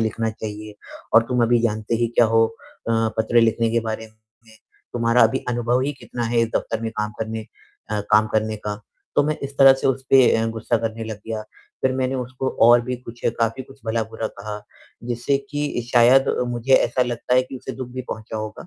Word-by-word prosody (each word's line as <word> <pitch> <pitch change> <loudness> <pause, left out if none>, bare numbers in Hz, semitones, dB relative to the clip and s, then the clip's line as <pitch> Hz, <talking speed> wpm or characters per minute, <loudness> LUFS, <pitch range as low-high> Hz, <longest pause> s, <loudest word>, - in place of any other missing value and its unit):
लिखना 110 0 -1
चाहिए। 105 -1 -7 0.4
और 115 - +8
तुम 125 -1 +1
अभी 120 0 +3
जानते 110 0 -1
ही 115 - 0
क्या 120 - +8
हो 115 0 +4 0.4
अ, - - +2 0.3
पत्र 115 +2 +3
लिखने 115 0 +2
के 115 +1 +1
बारे 110 0 -4
में? 110 0 -24 0.8
तुम्हारा 115 0 +3
अभी 115 +4 +3
अनुभव 120 +1 +1
ही 140 +2 -1
कितना 120 - -5
है 115 +1 0
इस 115 - 0
दफ़्तर 115 0 -3
में 115 - -2
काम 105 0 -1
करने 110 0 -4 0.4
अ, 105 -1 0
काम 110 0 +6
करने 110 0 0
का?" 105 0 -3 0.4
तो - - +6
मैं 155 0 0
इस 140 0 -6
तरह 135 -1 +9
से 135 - -2
उस 135 0 0
पे 130 -2 +7
अ, 115 - 0
गुस्सा 115 +1 -1
करने 115 0 -4
लग 110 -2 -5
गया। 110 -1 -4 0.4
फिर 130 - +2
मैंने 130 0 -1
उसको 130 +1 -3 0.2
और 120 0 +7
भी 125 +1 -3
कुछ, 120 -1 -12 0.2
काफ़ी 115 +3 0
कुछ 135 +1 -17
भला 110 0 0
बुरा 115 0 -3
कहा, 105 0 -7 0.4
जिससे 120 +3 0
कि 145 -4 -2
शायद 125 +3 +6 0.2
मुझे 120 +2 -1
ऐसा 130 - +3
लगता 120 0 -1
है 130 - +5
कि 130 +1 -8
उसे 130 +1 -7
दुःख 130 -2 -7
भी 130 - -4
पहुँचा 110 0 -6
होगा। 110 +8 -6
115 Hz, 210 wpm, -22 LUFS, 110-125 Hz, 0.8 s, तरह